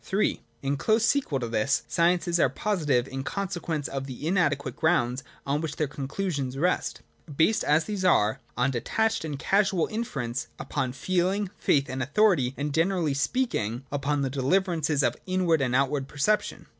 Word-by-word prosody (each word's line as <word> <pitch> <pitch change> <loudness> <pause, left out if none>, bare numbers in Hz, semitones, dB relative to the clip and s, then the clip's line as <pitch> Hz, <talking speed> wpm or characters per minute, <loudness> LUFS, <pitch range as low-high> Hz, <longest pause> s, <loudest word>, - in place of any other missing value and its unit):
(Ill) 200 +3 +2 0.3
In 140 +1 0
close 220 +8 +2
sequel 235 - +1
to 120 - -3
this, 115 +4 +1
sciences 175 0 +2
are 135 - +4
positive 145 - 0
in 135 0 -5
consequence 175 -5 -3
of 135 0 -4
the 130 +2 -7
inadequate 155 -5 +1
grounds 135 -6 +1 0.2
on 145 +2 0
which 155 -2 -4
their 155 - 0
conclusions 140 -1 -3
rest: 180 +5 0 0.4
based 205 +7 +3
as 150 +2 +3
these 205 -3 -3
are 110 - +3 0.2
on 130 +2 +2
detached 220 - 0
and 150 -3 -4
casual 195 +2 +2
infer 220 - -3
ence, 120 +1 -3
upon 135 -3 -2
feeling, 185 +7 0
faith, 140 -1 +2
and 130 0 -4
authority, 140 - +2
and, 145 0 -2
generally 165 -2 +1
speaking, 135 - -1
upon 145 0 0
the 135 - -1
deliverances 155 +1 +1
of - - +1
inward 180 -4 +2
and 125 -2 +1
outward 135 0 +1
perception. 180 +10 0
150 Hz, 165 wpm, -27 LUFS, 135-185 Hz, 0.4 s, are